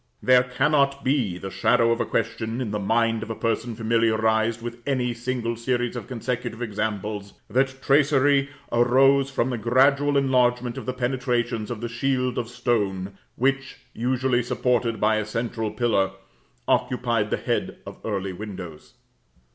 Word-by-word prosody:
There 125 Hz, -1 st, +6 dB
cannot 140 Hz, +2 st, +1 dB
be 125 Hz, -10 st, 0 dB
the 95 Hz, +1 st, -7 dB
shadow 115 Hz, +2 st, +3 dB
of 115 Hz, +1 st, +1 dB
a -, -, -1 dB
question, 115 Hz, +1 st, -2 dB
in 120 Hz, -5 st, -3 dB
the 105 Hz, -, -2 dB
mind 115 Hz, +2 st, +1 dB
of 115 Hz, -, -6 dB
a 115 Hz, -, -3 dB
person 115 Hz, +1 st, -2 dB
familiarised 110 Hz, 0 st, +1 dB
with 120 Hz, 0 st, -7 dB
any 125 Hz, -3 st, 0 dB
single 120 Hz, -1 st, -3 dB
series 120 Hz, +1 st, -1 dB
of 120 Hz, -, -6 dB
consecutive 120 Hz, -1 st, -4 dB
examples, 105 Hz, -2 st, -3 dB, 0.2 s
that 135 Hz, +3 st, +1 dB
tracery 140 Hz, 0 st, +3 dB, 0.2 s
arose 135 Hz, +3 st, +4 dB
from 130 Hz, -1 st, -1 dB
the 120 Hz, -, -3 dB
gradual 140 Hz, +5 st, +3 dB
enlargement 125 Hz, -3 st, +2 dB
of -, -, -7 dB
the 130 Hz, -, -1 dB
penetrations 120 Hz, -3 st, -1 dB
of 120 Hz, -3 st, -5 dB
the 120 Hz, -, -2 dB
shield 125 Hz, +1 st, -1 dB
of 120 Hz, -1 st, -4 dB
stone 100 Hz, -6 st, -1 dB, 0.2 s
which, 135 Hz, +1 st, 0 dB, 0.2 s
usually 125 Hz, +1 st, +1 dB
supported 120 Hz, -1 st, 0 dB
by 110 Hz, +1 st, +3 dB
a 110 Hz, -, 0 dB
central 115 Hz, 0 st, -3 dB
pillar, 100 Hz, -5 st, +1 dB, 0.5 s
occupied 120 Hz, -4 st, +1 dB
the -, -, 0 dB
head -, -, -2 dB
of -, -, -10 dB
early 100 Hz, -3 st, -3 dB
windows. 90 Hz, -5 st, -9 dB
120 Hz, 155 wpm, -24 LUFS, 110-130 Hz, 0.5 s, There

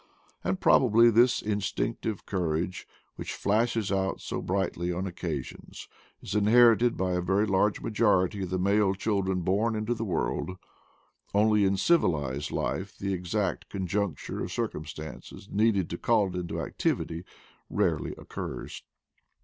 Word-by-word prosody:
And 95 Hz, -1 st, -1 dB
probably 115 Hz, -1 st, +5 dB
this 120 Hz, +2 st, +4 dB
instinctive 105 Hz, +1 st, -2 dB
cour 85 Hz, -5 st, -1 dB
age, 90 Hz, +2 st, -4 dB, 0.3 s
which -, -, -5 dB
flashes 110 Hz, 0 st, +1 dB
out 95 Hz, -1 st, 0 dB
so -, -, -4 dB
brightly 90 Hz, -2 st, -1 dB
on 90 Hz, +2 st, -2 dB
occasions, 85 Hz, -7 st, -6 dB, 0.4 s
is 95 Hz, -, -5 dB
inherited 115 Hz, +3 st, +5 dB
by 95 Hz, 0 st, 0 dB
a 90 Hz, 0 st, 0 dB
very 95 Hz, +4 st, +2 dB
large 100 Hz, +1 st, +1 dB
majority 105 Hz, -3 st, +2 dB
of 95 Hz, -, -3 dB
the 95 Hz, -, -1 dB
male 100 Hz, +1 st, +2 dB
children 95 Hz, -2 st, 0 dB
born 105 Hz, +6 st, +1 dB
into 110 Hz, +2 st, -1 dB
the 115 Hz, -1 st, -4 dB
world; 90 Hz, -1 st, -2 dB, 0.8 s
only 105 Hz, 0 st, +4 dB
in 95 Hz, 0 st, +2 dB
civilized 75 Hz, -, +1 dB
life 100 Hz, +1 st, -3 dB
the 100 Hz, 0 st, -2 dB
exact 90 Hz, +1 st, -2 dB
conjuncture 95 Hz, -3 st, -2 dB
of -, -, -5 dB
circumstances 80 Hz, +4 st, -6 dB
needed 100 Hz, -4 st, +2 dB
to 85 Hz, -, -4 dB
call 110 Hz, -4 st, +2 dB
it 90 Hz, -, -7 dB
into 90 Hz, -1 st, -3 dB
activity 80 Hz, +1 st, -2 dB, 0.5 s
rarely -, -, 0 dB
occurs. -, -, -7 dB
95 Hz, 140 wpm, -28 LUFS, 90-105 Hz, 0.8 s, probably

